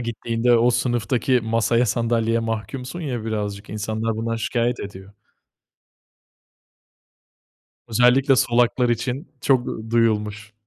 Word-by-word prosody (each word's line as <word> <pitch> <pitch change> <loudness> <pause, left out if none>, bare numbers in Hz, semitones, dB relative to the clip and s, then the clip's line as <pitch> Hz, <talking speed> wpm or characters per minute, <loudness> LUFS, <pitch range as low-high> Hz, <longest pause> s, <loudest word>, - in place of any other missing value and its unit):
gittiğinde 115 0 0
o 120 +2 +4
sınıftaki 120 +1 +1
masaya 115 +2 +1
sandalyeye 115 +1 +1
mahkumsun 115 +7 -4
ya, 125 -8 -4
birazcık, 105 -2 -4
insanlar 110 +1 -2
bundan 115 +1 -2
şikâyet 120 +1 -1
ediyor. 100 0 -9 2.8
Özellikle, 125 +4 +4
solaklar 120 +1 +2
için 125 +6 -2
çok 130 -3 +2 0.2
duyulmuş. 105 -2 0
115 Hz, 95 wpm, -22 LUFS, 110-125 Hz, 2.8 s, o